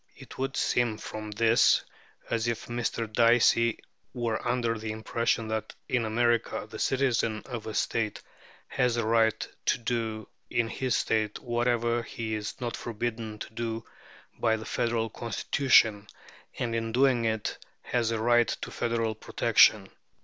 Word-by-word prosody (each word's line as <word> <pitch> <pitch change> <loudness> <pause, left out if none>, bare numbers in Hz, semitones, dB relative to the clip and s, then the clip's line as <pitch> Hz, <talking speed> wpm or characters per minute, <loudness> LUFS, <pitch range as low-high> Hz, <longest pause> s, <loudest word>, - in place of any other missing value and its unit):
It - - -13
would 135 0 -2
seem 120 -3 +1
from 110 0 -7
this 115 +2 +4 0.4
as 115 0 -1
if 115 -2 -2
Mr. 120 -1 -2
Dicey 115 0 +4 0.4
were 115 -3 -1
under 120 -1 +1
the 110 0 -4
impression 110 +1 -1
that 110 0 -3
in 125 -4 +1
America 120 +1 +1
the 110 - -9
citizen 120 -5 +1
of 120 -4 -6
a 110 - -5
State 110 -2 -1 0.4
has 125 -1 +1
a 115 - 0
right 110 -1 +2 0.2
to - - +3
do 115 -2 -3 0.2
in 115 -1 0
his 130 +1 0
State 110 -1 0
whatever 120 0 0
he 110 -1 -5
is 105 -1 -4
not 120 -2 -3
forbidden 115 -1 -4
to 110 - -8
do 115 0 -4 0.5
by 115 -1 +3
the 110 - -8
Federal 115 -1 0
Constitution, 115 -2 +2 0.5
and 115 -1 -2
in 115 0 -2
doing 125 -2 +3
it 110 -1 -2 0.2
has 120 -2 0
a 115 - 0
right 120 +1 +4
to - - -4
federal 115 -1 -1
protection. 110 - +4
115 Hz, 150 wpm, -28 LUFS, 110-120 Hz, 0.5 s, this